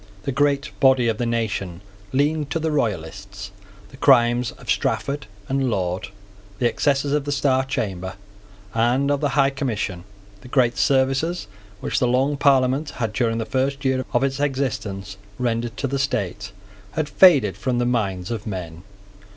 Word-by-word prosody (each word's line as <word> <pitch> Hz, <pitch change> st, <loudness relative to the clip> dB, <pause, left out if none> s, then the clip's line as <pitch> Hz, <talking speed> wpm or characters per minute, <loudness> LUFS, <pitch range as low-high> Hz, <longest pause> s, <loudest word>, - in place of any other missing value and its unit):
The -, -, -2 dB
great 140 Hz, +1 st, +1 dB
body 130 Hz, -3 st, +4 dB
of 110 Hz, -, -2 dB
the 120 Hz, -, 0 dB
nation 105 Hz, -7 st, -2 dB, 0.3 s
leaned 145 Hz, +2 st, +1 dB
to 145 Hz, -, -1 dB
the 160 Hz, 0 st, -1 dB
Royalists. 100 Hz, -, -3 dB, 0.4 s
The 135 Hz, -, -14 dB
crimes 120 Hz, -4 st, +4 dB
of -, -, -16 dB
Strafford 140 Hz, -4 st, -1 dB, 0.2 s
and 135 Hz, -1 st, 0 dB
Laud, 90 Hz, -4 st, -2 dB, 0.5 s
the 120 Hz, -, +2 dB
excesses 140 Hz, +3 st, +1 dB
of 150 Hz, -1 st, 0 dB
the 145 Hz, -, -2 dB
Star 135 Hz, -2 st, +2 dB
Chamber 95 Hz, -8 st, -3 dB, 0.6 s
and 125 Hz, +5 st, +2 dB
of 145 Hz, 0 st, 0 dB
the 145 Hz, -1 st, 0 dB
High 135 Hz, -1 st, +4 dB
Commission, 110 Hz, -10 st, -3 dB, 0.4 s
the -, -, -12 dB
great 125 Hz, -2 st, +2 dB
services 135 Hz, -, +1 dB, 0.4 s
which -, -, -1 dB
the 125 Hz, -, +2 dB
Long 130 Hz, +4 st, +2 dB
Parliament 140 Hz, +1 st, +3 dB
had, 115 Hz, -3 st, -2 dB
during 115 Hz, -1 st, 0 dB
the 115 Hz, -, -2 dB
first 135 Hz, +2 st, -1 dB
year 130 Hz, -1 st, +1 dB
of -, -, +2 dB
its 135 Hz, 0 st, -1 dB
existence, 110 Hz, -9 st, -2 dB, 0.2 s
rendered 120 Hz, -1 st, -2 dB
to -, -, -2 dB
the 135 Hz, +1 st, -1 dB
state, 105 Hz, -7 st, -2 dB, 0.4 s
had 155 Hz, -2 st, -1 dB
faded 145 Hz, -, +5 dB
from 120 Hz, +5 st, -1 dB
the 120 Hz, -, +1 dB
minds 100 Hz, -6 st, -1 dB
of 110 Hz, -2 st, -4 dB
men. 85 Hz, -5 st, -5 dB
130 Hz, 165 wpm, -22 LUFS, 105-140 Hz, 0.6 s, faded